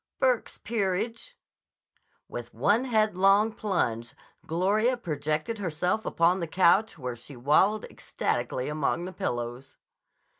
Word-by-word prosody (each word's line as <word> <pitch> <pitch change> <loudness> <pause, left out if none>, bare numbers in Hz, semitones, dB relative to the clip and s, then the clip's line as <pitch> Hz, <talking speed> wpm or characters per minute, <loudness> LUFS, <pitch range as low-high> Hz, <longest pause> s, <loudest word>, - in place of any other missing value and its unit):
"Burke's 255 -3 +1
Peerage." 225 - -2 0.9
With - - -8
one 225 +5 +2
headlong 215 -2 +3
plunge 125 - -2 0.3
Gloria 210 +9 +2
projected 155 +2 -2
herself 180 +4 -1
upon 170 +3 +2
the 170 - -3
couch 185 +5 +3
where 125 -4 -4
she 125 +4 -10
wallowed 155 - +3
ecstatically 125 - -3
among 155 +3 -1
the 185 - -7
pillows. 120 -3 -4
185 Hz, 110 wpm, -27 LUFS, 150-215 Hz, 0.9 s, headlong